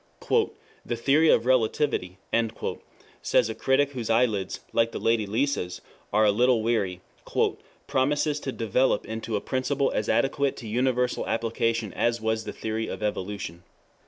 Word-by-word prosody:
] - - -30
"The 120 - -2
theory 145 +7 +3
of 115 - +4
Relativity," 115 -6 +1 1.0
says - - +2
a - - -3
critic 135 +4 +2
whose 120 -5 -5
eyelids, 110 -5 +1
like 115 0 +2
the - - -3
Lady 115 -2 +1
Lisa's, 110 -6 -1 0.3
are 110 +1 +4
a 105 - +5
little 120 +1 +3
weary, 100 -6 0 0.8
"promises 145 +3 +1
to 135 - -4
develop 115 +1 +1
into 110 0 -4
a 100 - -1
principle 135 +1 0
as - - -1
adequate 140 0 +1
to 115 - -8
universal 125 +2 0
application 115 -1 -1
as 120 0 +1
was 110 0 -1
the - - -4
theory 110 0 -3
of - - -5
Evolution. 100 -4 -3
115 Hz, 150 wpm, -26 LUFS, 110-130 Hz, 1.0 s, a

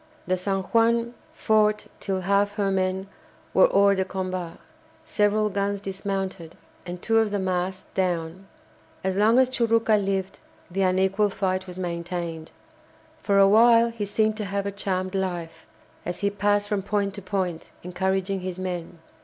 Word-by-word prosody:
The 185 - +1
"San 195 +1 -2
Juan" 230 +3 +2 0.2
fought 215 -1 +2
till 190 -2 -2
half 200 +2 +1
her 200 -2 0
men 190 0 0 0.5
were - - +6
hors 200 -1 +4
de 190 - +2
combat, 185 -2 -4 0.5
several 210 0 +2
guns 200 0 -1
dismounted, 195 -3 -4 0.3
and 175 0 -5
two 225 +4 +2
of 220 -1 +2
the 205 - -1
masts 185 0 -2
down. 180 0 -2 0.6
As 190 0 0
long 215 +4 +4
as 260 0 +5
Churucca 230 -3 +2
lived 195 -1 -2 0.3
the 195 +2 -1
unequal 190 +2 +2
fight 190 -1 -2
was 180 0 -9
maintained. 170 -2 -4 0.7
For 200 -1 +1
a 195 0 +7
while 230 +2 +6
he 225 -3 -4
seemed 215 +1 +1
to 215 - -3
have 200 0 -2
a 200 - -2
charmed 185 -2 -2
life, 175 -4 -4 0.4
as 175 - -5
he 200 0 +1
passed 205 0 +1
from 205 -2 -1
point 200 0 -1
to 200 - -7
point, 185 -3 -3
encouraging 190 +2 -1
his 185 -1 -5
men. 180 -2 -5
195 Hz, 160 wpm, -25 LUFS, 185-205 Hz, 0.7 s, a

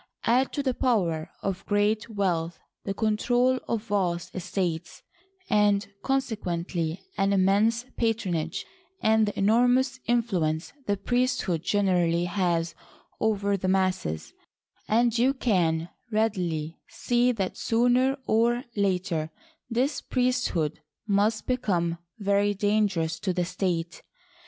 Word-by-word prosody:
Add 250 +3 +2
to 285 - -1
the 260 -2 +1
power 180 -12 0
of 195 -1 -2
great 210 +2 +1
wealth 175 -6 -1 0.3
the 195 - -1
control 245 +4 +2
of 225 -2 -1
vast 185 -6 -1
estates 175 -2 -3 0.4
and 205 -1 +3 0.2
conse 270 -3 0
quently 170 -3 -3 0.2
an 195 0 +3
immense 205 +5 +3
patronage, 185 -8 -1 0.4
and 220 0 +4
the 205 - -4
enormous 245 +5 +3
influ 220 -10 +2
ence 160 +2 -5
the 205 0 +1
priesthood 245 - 0
generally 175 -3 +2
has 175 -3 0 0.5
over 200 -2 +1
the 190 -1 -2
masses, 185 - 0 0.5
and 235 +1 +3
you 255 +4 +3
can 175 -9 +1 0.2
readily 180 -8 -1
see 245 +1 +1
that 195 -5 -2
sooner 245 +4 +2
or 235 +2 +2
later 185 -5 0 0.4
this 255 +5 0
priesthood 250 - 0 0.3
must 210 +2 +1
become 175 -9 0 0.2
very 200 0 +1
dangerous 200 -5 +1
to 185 - -1
the 180 -1 0
state. 170 -2 -2
200 Hz, 120 wpm, -27 LUFS, 175-230 Hz, 0.5 s, and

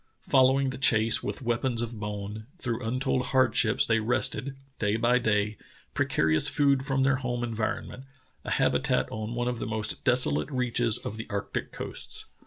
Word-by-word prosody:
Following 135 0 +4
the 130 - -8
chase 115 -4 +5
with 105 +4 -5
weapons 120 0 -1
of 120 -1 -3
bone, 105 +1 -6
through 125 -6 -3
untold 130 +2 -1
hardships 120 -4 +3
they 115 -1 +2
wrested, 125 +4 0 0.2
day 105 0 +1
by 120 +2 +2
day, 105 -3 0 0.3
precarious 80 0 +1
food 140 -2 +2
from 135 -1 0
their 135 0 +2
home 120 -1 -3
environment 115 +3 -4 0.2
— 130 - -39
a - - -6
habitat 135 -1 +1
on 110 +2 -5
one 120 0 -1
of 125 -1 -2
the - - -4
most 110 0 -2
desolate 125 - +3
reaches 120 -4 +1
of 110 - -7
the 110 - -7
arctic 100 -2 -4
coasts. - - -5
120 Hz, 170 wpm, -27 LUFS, 110-130 Hz, 0.3 s, chase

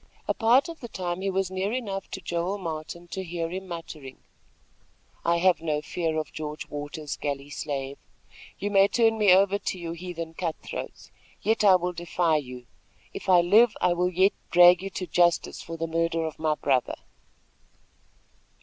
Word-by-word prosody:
A - - +2
part 240 +6 +4
of 330 -1 -8
the 240 - -7
time 180 -4 -4
he 195 - -1
was 190 -1 -1
near 190 +2 -1
enough 205 -6 -4
to - - -6
Joel 175 +4 -2
Martin 170 -1 -6
to 190 +2 -4
hear 170 -1 -4
him 190 +1 -5
muttering: 155 -6 -8 1.1
"I 170 0 +2
have 180 -1 +3
no 155 -2 -1
fear 160 0 -2
of 155 - -4
George 150 -1 -6
Waters, 145 0 -5
galley 140 0 -4
slave. 140 -2 -4 0.6
You 205 +1 -3
may 195 0 +6
turn 225 +1 +2
me 205 -3 +5
over 195 +2 +4
to 190 - -3
your 170 -2 -5
heathen 170 -1 -6
cut 165 -1 -3
throats; - - -7 0.3
yet 220 0 +1
I 195 -3 +7
will 180 0 -1
defy 170 -2 +1
you. 125 -4 -7 0.5
If - - -6
I 180 -2 +7
live, 210 +6 +5
I 180 -1 +3
will 180 +1 +1
yet 190 +3 +3 0.2
drag 175 0 +7
you 195 - -4
to 185 -1 -5
justice 175 0 +1
for 165 0 -7
the 165 - -2
murder 165 0 0
of 160 - -6
my 155 -1 +1
brother." 130 -4 0
175 Hz, 180 wpm, -26 LUFS, 160-190 Hz, 1.1 s, I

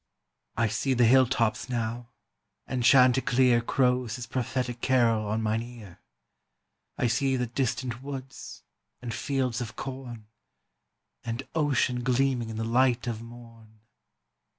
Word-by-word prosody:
"I 115 0 +2
see 130 +5 -1
the 120 -1 +4
hill 130 +2 +6
tops 115 -1 0
now, 120 0 -3 0.6
and 125 -2 -3
chanticleer 125 -1 +5
Crows 125 -1 +1
his 125 -2 -6
prophetic 125 0 -3
carol 115 -5 +2
on 110 +2 -1
mine 110 +1 0
ear; 115 -7 -11 1.0
I - - 0
see 135 +3 +1
the 125 -1 0
distant 125 0 -2
woods 135 -1 -8 0.4
and 120 -1 -6
fields 130 -1 -1
of 115 -1 -6
corn, 130 -4 -7 1.0
And 115 +3 -4
ocean 135 -5 +1
gleaming 125 -2 +1
in 110 - -6
the 110 - -2
light 120 +1 +2
of 115 -2 -4
morn." 115 -2 -14
120 Hz, 130 wpm, -27 LUFS, 115-130 Hz, 1.0 s, hill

